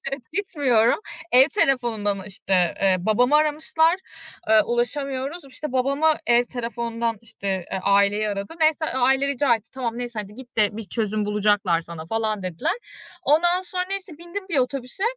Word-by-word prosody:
Evet, 275 -1 -4
gitmiyorum. 285 - +2 0.3
Ev 260 +4 +7
telefonundan, 235 - +1
işte, 185 -3 0
eee, 190 -1 +4
babamı 240 +9 +3
aramışlar. 310 +2 +2 0.5
Eee, 220 -1 +6
ulaşamıyoruz. 270 +6 -2
İşte, 275 +1 -7
babamı 275 +5 +2
ev 240 +1 +5
telefonundan, 235 -1 -3
işte, 205 -3 -8 0.2
eee, 190 - -2
aileyi 200 +2 +3
aradı. 200 +7 -4
Neyse, 315 0 +3
aile 265 +2 +3
rica 275 -3 +2
etti. 220 -1 -8
"Tamam, 240 -3 -3
neyse. 240 -2 -5
Hadi 205 +1 -13
git 245 -1 -13
de 210 -1 +2
bir 225 - -5
çözüm 215 -1 -1
bulacaklar 205 -4 +2
sana." 165 -1 -9
falan 215 -1 -1
dediler. 185 - -2 0.5
Ondan 345 +5 +3
sonra, 365 0 -3
neyse, 380 -5 -5
bindim 375 +3 -7
bir 320 - +1
otobüse. 255 +6 -2
245 Hz, 155 wpm, -23 LUFS, 210-290 Hz, 0.5 s, Ev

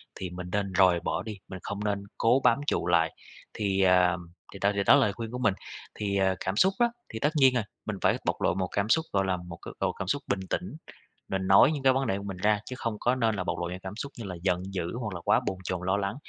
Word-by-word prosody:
thì 90 - -5
mình 90 0 -7
nên 100 -2 -1
rời 90 -2 +5
bỏ - - -2
đi, 105 -3 -6
mình 95 - -7
không 100 +1 -4
nên 100 -1 -1
cố 120 +4 +3
bám 120 - +4
trụ - - 0
lại. 80 -2 +2 0.4
Thì, 100 -2 0
à, 90 -1 +4 0.4
thì 100 - -9
đó 100 +1 +3
thì 100 - +1
đó - - +6
là - - +5
lời 100 -5 +2
khuyên 115 +1 -6
của 125 - -4
mình, 110 -6 +3 0.4
thì, 100 -2 -1
à, 95 -1 +2
cảm 95 +1 -2
xúc 190 - +4
á, 240 - +5 0.3
thì 110 - -4
tất 145 - +2
nhiên 135 -3 +5
rồi, 120 - +1 0.2
mình 105 -2 -3
phải - - +3
bộc - - -1
lộ - - +2
một 95 0 -1
cảm 100 +1 -1
xúc, 160 +6 +3
gọi 95 -1 +2
là, 95 -1 0
một 90 -1 -9
cái - - -8
độ - - +1
cảm 95 - -6
xúc 145 +7 0
bình 100 - 0
tĩnh, 180 -2 -3 0.5
mình 95 -1 -2
nói 100 +9 +7
những 145 -3 -3
cái 130 -1 +5
vấn 135 -1 0
đề 95 - 0
của 100 - -7
mình 100 -2 -5
ra, 105 +2 +2
chứ 130 - -6
không 110 -3 -3
có 125 +2 +2
nên 115 -4 +1
là 90 - -2
bộc - - -3
lộ 85 0 -2
những 90 +1 -6
cảm 95 +2 -6
xúc 140 +4 -5
như 115 - -6
là 90 -2 -5
giận 90 -1 +1
dữ 90 +3 -3
hoặc 105 -5 -4
là 85 - -6
quá - - +4
bồn 95 - -1
chồn, 90 -1 -3
lo 100 +2 +2
lắng, 100 +3 -2
100 Hz, 290 wpm, -28 LUFS, 95-115 Hz, 0.5 s, nói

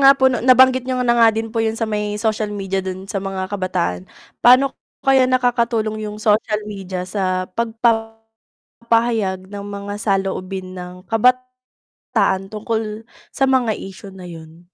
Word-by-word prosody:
nga 275 0 +9
po 265 - +5
'no 245 - -1
nabanggit 255 0 +6
niyo 255 -1 0
na 235 - +4
nga 230 -1 +6
din 225 +1 -3
po 230 - 0
yung 220 0 -1
sa 225 - 0
may 210 -1 -2
social 215 -1 0
media 195 -2 -2
do'n 190 0 -6
sa 195 0 -3
mga 195 -1 -3
kabataan. 135 - -1 0.4
Pa'no 255 +3 +6
po - - -54 0.3
kaya 265 -1 +5
nakakatulong 235 -4 0
yung 210 - -7
social 210 0 +2
media 190 -3 -5
sa 185 -1 -1 1.1
pagpapahayag 225 -5 -1
ng 200 0 -7
mga 200 0 -6
saloobin 190 -2 -2
ng 180 0 -7
kabataan 250 -5 -1
tungkol 215 0 -3 0.3
sa 270 - +2
mga 255 -4 +2
issue 195 0 -10
na 185 -1 -10
'yun? 165 0 -12
210 Hz, 155 wpm, -20 LUFS, 190-235 Hz, 1.1 s, nga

